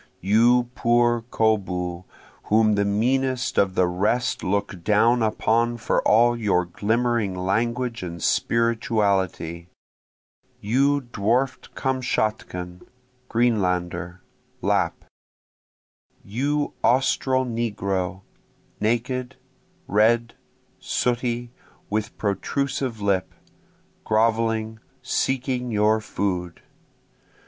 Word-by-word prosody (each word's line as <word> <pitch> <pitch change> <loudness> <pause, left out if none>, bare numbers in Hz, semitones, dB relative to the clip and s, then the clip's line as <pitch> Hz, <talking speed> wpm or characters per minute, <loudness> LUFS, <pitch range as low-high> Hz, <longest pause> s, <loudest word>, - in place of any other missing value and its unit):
You 120 +5 +3
poor 120 -1 +2
koboo 90 -6 0 0.4
whom 110 0 +3
the 100 0 +1
meanest 125 +5 0
of 95 -2 +2
the 90 - +4
rest 105 +8 0
look 100 -2 -2
down 115 +4 +3
upon 115 +2 +1
for 115 - 0
all 120 +2 +5
your 100 -6 +1
glimmering 110 +2 0
language 115 +6 -1
and 85 -2 -6
spirituality! 100 -7 0 0.9
You 140 +7 +2
dwarf'd 120 +2 -1
Kamtschatkan, 110 -9 -2 0.5
Greenlander, 90 -6 0 0.4
Lapp! - - 0 1.2
You 145 +8 -1
Austral 130 +1 +2
negro, 100 -5 -2 0.6
naked, 125 +3 -1 0.5
red, 115 +3 +2 0.5
sooty, 120 -1 -1 0.4
with 105 0 -2
protrusive 125 +3 -2
lip, 95 -2 0 0.7
groveling, 110 -1 +1 0.2
seeking 130 -1 -1
your 110 0 +2
food! 90 -5 -3
110 Hz, 80 wpm, -24 LUFS, 100-120 Hz, 1.2 s, all